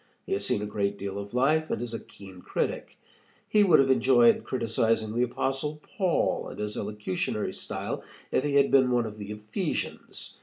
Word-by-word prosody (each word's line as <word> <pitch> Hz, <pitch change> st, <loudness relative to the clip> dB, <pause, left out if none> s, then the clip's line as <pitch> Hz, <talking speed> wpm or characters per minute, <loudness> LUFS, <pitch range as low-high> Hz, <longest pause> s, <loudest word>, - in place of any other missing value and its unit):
He -, -, -2 dB
has 100 Hz, -, -1 dB
seen 100 Hz, +1 st, 0 dB
a -, -, -2 dB
great 100 Hz, -1 st, -1 dB
deal 100 Hz, 0 st, -4 dB
of 100 Hz, +3 st, -7 dB
life 155 Hz, +5 st, +2 dB
and -, -, -1 dB
is 120 Hz, 0 st, -4 dB
a 115 Hz, -, -3 dB
keen 95 Hz, -2 st, -13 dB
critic. -, -, -3 dB, 0.5 s
He 210 Hz, -1 st, +4 dB
would 175 Hz, -6 st, +6 dB
have 135 Hz, -1 st, +4 dB
enjoyed 125 Hz, -3 st, +5 dB
criticizing 115 Hz, -2 st, 0 dB
the 120 Hz, -, +2 dB
Apostle 135 Hz, +4 st, -1 dB, 0.2 s
Paul 185 Hz, -5 st, +1 dB
and -, -, -9 dB
his 105 Hz, 0 st, -3 dB
elocutionary 105 Hz, -2 st, -2 dB
style -, -, -4 dB, 0.3 s
if -, -, +2 dB
he 145 Hz, -1 st, 0 dB
had 140 Hz, -1 st, +4 dB
been 130 Hz, -2 st, +5 dB
one 120 Hz, -1 st, +2 dB
of 105 Hz, -1 st, -7 dB
the 100 Hz, 0 st, -7 dB
Ephesians. 105 Hz, 0 st, -4 dB
115 Hz, 190 wpm, -28 LUFS, 105-135 Hz, 0.5 s, would